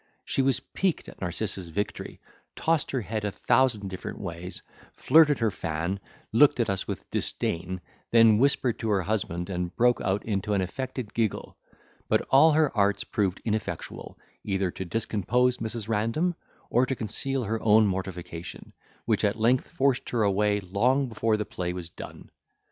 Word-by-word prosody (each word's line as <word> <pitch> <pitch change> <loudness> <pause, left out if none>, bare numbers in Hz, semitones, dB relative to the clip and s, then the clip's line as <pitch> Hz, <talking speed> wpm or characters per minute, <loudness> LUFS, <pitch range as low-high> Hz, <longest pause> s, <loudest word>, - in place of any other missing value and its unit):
She - - 0
was 135 -1 +2
piqued 190 -4 -2
at - - -15
Narcissa's 95 0 -3
victory, 100 +6 -4 0.4
tossed 165 -2 +1
her 130 - -1
head 110 +1 -4
a 105 - 0
thousand 110 -3 +2
different 95 - -6
ways, 90 -1 -5 0.3
flirted 150 0 +5
her 115 -2 +1
fan, 85 +4 -3 0.3
looked 140 +3 +5
at 115 -4 +2
us 95 - -2
with - - -5
disdain, 90 +2 -2 0.3
then 115 -2 +6
whispered 130 -3 +2
to 115 - -2
her 100 -3 +2
husband, 90 -4 -2
and 90 -2 -3
broke 120 0 +3
out 95 +2 -1
into 105 -1 -1
an 95 - +2
affected 125 +3 -4
giggle; 115 -3 -2 0.5
but - - +2
all 155 +4 +7
her 155 -3 +2
arts 100 -1 +2
proved 95 -3 -1
ineffectual, 110 -1 -4 0.3
either 95 -2 -1
to 95 - -6
discompose 115 +5 0
Mrs. 110 -1 -4
Random, 115 +11 0 0.4
or 125 +2 +3
to 135 - -1
conceal 125 +4 -2
her 110 +1 -2
own 110 0 +5
mortification, 90 -3 -5 0.3
which - - +1
at 105 +2 +1
length 125 +3 +3
forced 135 -1 0
her 115 -3 +1
away 105 +1 +2
long 125 +9 +1
before 110 -1 +1
the 105 - -2
play 90 -2 -4
was 90 -2 -6
done. - - -11
110 Hz, 165 wpm, -27 LUFS, 95-125 Hz, 0.5 s, all